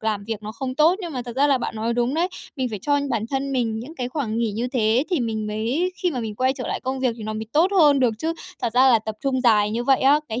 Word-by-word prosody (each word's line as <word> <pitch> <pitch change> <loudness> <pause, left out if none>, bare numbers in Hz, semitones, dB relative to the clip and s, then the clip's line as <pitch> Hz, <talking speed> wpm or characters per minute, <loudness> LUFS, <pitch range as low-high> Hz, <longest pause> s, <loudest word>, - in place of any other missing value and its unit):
làm 215 -2 -2
việc 220 -2 -4
nó 215 +1 -6
không 255 +1 -4
tốt. 315 +4 +4
Nhưng 345 -4 -5
mà 255 - -3
thật 240 0 -8
ra 285 +2 +4
là 275 -2 +3
bạn 240 - -4
nói 225 +2 -1
đúng 240 +3 0
đấy, 345 +3 +1 0.3
mình 260 -2 -1
phải 210 - -4
cho 285 0 +2
bản 225 -3 0
thân 275 0 -2
mình 230 -4 0
những 265 +8 -8
cái 250 -5 -3
khoảng 250 -5 -3
nghỉ 230 -3 0
như 235 +4 -2
thế 240 0 +2
thì 350 -6 +1
mình 220 -2 -2
mới 235 +13 -1
khi 360 - +2
mà 260 -6 -3
mình 220 -2 -4
quay 255 +3 +1
trở 255 -2 -6
lại - - -3
công 260 0 -3
việc 255 -3 +1
thì 225 - -9
nó 215 0 -4
mới 220 0 -5
tốt 335 +5 +4
hơn 290 -4 +5
được 240 -3 +2
chứ. 325 +1 -1 0.3
Thật 235 - -1
ra 260 +1 +6
là 230 - +5
tập 220 0 -6
trung 265 -2 0
dài 210 -4 +4
như 235 +2 -2
vậy 270 -1 +3
á, 285 +3 +5
cái 225 +3 -3
245 Hz, 310 wpm, -23 LUFS, 220-275 Hz, 0.3 s, ra